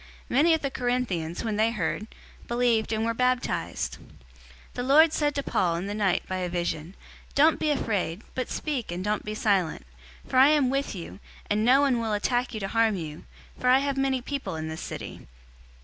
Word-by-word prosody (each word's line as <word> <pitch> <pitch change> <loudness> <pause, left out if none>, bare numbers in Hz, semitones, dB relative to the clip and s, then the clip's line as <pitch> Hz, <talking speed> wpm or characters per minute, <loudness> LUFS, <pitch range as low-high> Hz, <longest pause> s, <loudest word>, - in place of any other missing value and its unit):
Many 320 +6 +4
of 320 - -5
the 275 - -1
Corinthians, 245 -11 -2
when 220 -2 -2
they 220 +1 +3
heard, 215 -1 -2 0.4
believed 235 -2 +1
and 220 0 0
were 230 - 0
baptized. 250 +1 -1
018:009 - - -17 0.6
The - - -4
Lord 300 +5 +5
said 295 -2 0
to 280 - -1
Paul 175 -9 +1
in 175 +3 -3
the 200 - -3
night 200 -4 +1
by 185 - -2
a 180 -1 -2
vision, 175 0 -3 0.4
"Don't 310 +2 +5
be 310 - +1
afraid, 205 - -1
but 255 - -3
speak 275 - -3
and 175 +1 -4
don't 210 0 -1
be 210 0 -5
silent; 190 - 0 0.4
018:010 - - -18
for 260 - +1
I 265 +2 +8
am 290 -4 +3
with 275 -4 -1
you, 180 +2 -8 0.3
and 210 +1 +2
no 260 +4 +5
one 270 -4 +2
will 225 -2 -1
attack 245 +4 0
you - - -3
to 195 - -2
harm 225 -1 +2
you, 155 -4 -7 0.3
for 250 - +2
I 255 - +7
have 280 0 0
many 270 -2 0
people 265 - -4
in 160 0 -4
this 160 0 -6
city." - - -7
230 Hz, 210 wpm, -27 LUFS, 195-265 Hz, 0.6 s, I